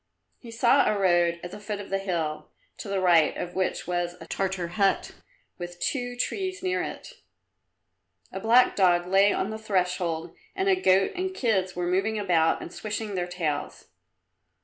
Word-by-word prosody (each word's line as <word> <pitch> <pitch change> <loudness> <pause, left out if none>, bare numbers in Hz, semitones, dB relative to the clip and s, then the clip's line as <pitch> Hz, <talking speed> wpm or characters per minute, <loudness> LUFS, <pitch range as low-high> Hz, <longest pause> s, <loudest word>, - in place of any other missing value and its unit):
He 240 - -12
saw 235 +4 +3
a 210 - -1
road 175 -3 +2
at 175 - -6
the 205 - -8
foot 210 0 -5
of 200 -1 -8
a 195 - +2
hill, 165 -6 -3 0.3
to - - -7
the 195 -1 0
right 170 -4 +4
of 175 - -5
which 185 0 -1
was 175 0 -2
a - - -10
Tartar 190 -3 -2
hut 195 +2 +1 0.5
with 175 0 -7
two 245 -3 -2
trees 375 +8 -3
near 370 0 0
it. - - -8 1.1
A 190 - -5
black 235 +5 +4
dog 175 -3 +3
lay 195 +2 +4
on 200 - -1
the 220 - -5
threshold 180 -5 -1 0.2
and 385 0 -1
a 385 - +5
goat 190 - +3
and 375 0 -3
kids 195 - 0
were 180 0 -2
moving 195 +5 0
about 175 -6 +2
and 170 - -9
swishing 215 0 -4
their 180 -2 -2
tails. 165 -5 -4
190 Hz, 175 wpm, -26 LUFS, 175-220 Hz, 1.1 s, a